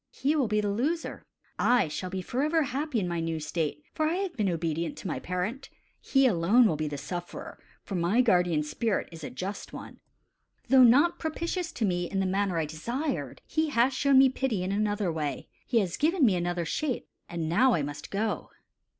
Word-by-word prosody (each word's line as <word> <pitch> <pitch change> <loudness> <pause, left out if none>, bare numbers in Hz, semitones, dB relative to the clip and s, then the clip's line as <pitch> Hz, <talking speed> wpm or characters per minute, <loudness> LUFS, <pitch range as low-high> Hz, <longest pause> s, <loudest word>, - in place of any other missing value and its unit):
He 285 +3 0
will 275 -6 +2
be 210 0 +1
the 205 -1 -1
loser. 295 +11 -2 0.3
I 245 -7 +4
shall 180 +5 -4
be 185 0 -4
forever 300 - +1
happy 275 -1 -2
in 185 - -1
my 170 -1 -2
new 165 -1 -2
state, 150 -1 -3
for 310 - +1
I 325 - 0
have 380 -2 -3
been 205 -3 +1
obedient 165 -1 -2
to - - -6
my 165 - -2
parent. 185 +9 -3 0.3
He 270 -1 +2
alone 215 +3 +4
will 195 - +2
be 155 0 -2
the 145 -1 -4
sufferer, 175 +5 -6 0.2
for - - -7
my 180 +7 +2
guardian 180 -9 +3
spirit 210 +7 -1
is 165 -1 -10
a - - -4
just 190 +9 -6
one. - - -9 0.7
Though 265 -1 +7
not 285 +9 +5
propitious 335 +2 -3
to 225 - -1
me 175 -2 -1
in 195 - -1
the 190 - +1
manner 190 -1 0
I 160 - +1
desired, 235 - -4
he 315 -1 0
has 255 0 +3
shown 275 +1 +3
me 265 0 +7
pity 255 -7 -1
in 185 - -2
another 205 -2 0
way 150 -5 -3 0.2
he 240 - +1
has 185 -3 -3
given 320 0 +3
me 205 -6 +4
another 175 -1 -1
shape; 265 - -2 0.2
and 170 -2 -3
now 240 +10 +4
I 150 - 0
must 145 0 -6
go." 210 +2 -2
205 Hz, 205 wpm, -28 LUFS, 170-265 Hz, 0.7 s, Though